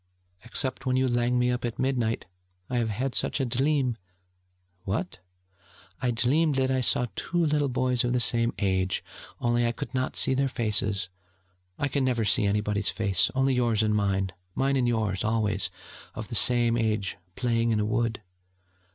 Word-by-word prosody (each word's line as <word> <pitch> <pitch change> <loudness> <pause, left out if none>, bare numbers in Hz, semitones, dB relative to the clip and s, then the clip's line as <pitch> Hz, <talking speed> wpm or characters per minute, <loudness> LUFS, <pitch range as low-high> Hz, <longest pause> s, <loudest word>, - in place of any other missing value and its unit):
'Except 130 +2 -1
when 130 - +2
you 130 0 +2
lang 120 0 +1
me 125 0 +2
up 125 0 -2
at 120 -2 -3
midnight. 125 -4 -1 0.5
I 125 - 0
have 115 -1 0
had 125 +5 -2
such - - +1
a 135 - +1
dleam 130 0 +1 0.4
...' 90 0 -44
'What?' 105 - -3 0.8
'I 125 - +1
dleamed 140 +6 +2
that 130 0 +1
I 130 -1 +1
saw 125 - +2
two 175 -1 0
little 150 -2 +1
boys 125 -1 +1
of 120 - 0
the 125 - +1
same 115 0 +3
age 95 -2 0 0.4
only 120 0 +1
I 115 - +2
could 140 +4 -7
not 130 0 -1
see - - +4
their 135 +1 +1
faces, 105 -5 -1 0.7
I 145 - 0
never 125 -4 +1
can 105 - +1
see 110 - +3
anybody's 105 0 0
face, 100 -5 +1
only 135 0 +2
yours 120 -4 +1
and 105 0 +1
mine, 95 -2 0 0.2
mine 135 +1 +1
and 125 -2 +2
yours 110 -5 0
always 105 -3 0 0.5
of - - -6
the - - -7
same 120 -1 +3
age 110 -3 -1 0.2
playing 115 -2 0
in 110 -2 +1
a 105 - +1
wood....' 115 0 -1
120 Hz, 180 wpm, -27 LUFS, 105-130 Hz, 0.8 s, see